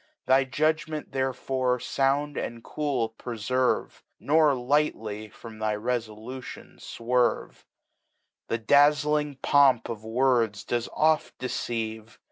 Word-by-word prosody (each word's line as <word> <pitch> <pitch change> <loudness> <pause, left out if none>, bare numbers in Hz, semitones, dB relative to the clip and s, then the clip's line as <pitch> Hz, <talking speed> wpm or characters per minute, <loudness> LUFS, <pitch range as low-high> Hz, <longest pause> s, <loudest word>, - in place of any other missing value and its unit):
Thy 130 +1 +4
Judgment 155 +2 -1
therefore 130 -1 -1
found 140 +3 0
and 115 -1 -5
cool 140 -7 -2
preferve. 125 +2 -1 0.2
Nor 155 0 +4
liglmy 120 -6 -1
from 115 -2 -12
thy 110 -1 0
Refolution 115 +2 -5
fwerye; 120 +1 -1 0.8
The 115 - -1
dazUng 145 +3 +3
Pomp 135 -5 +4
of 110 -2 -6
Words 115 -3 +1
does 120 -1 -2
oft 155 0 +1
deceive. 115 -3 -4
125 Hz, 100 wpm, -26 LUFS, 115-145 Hz, 0.8 s, Thy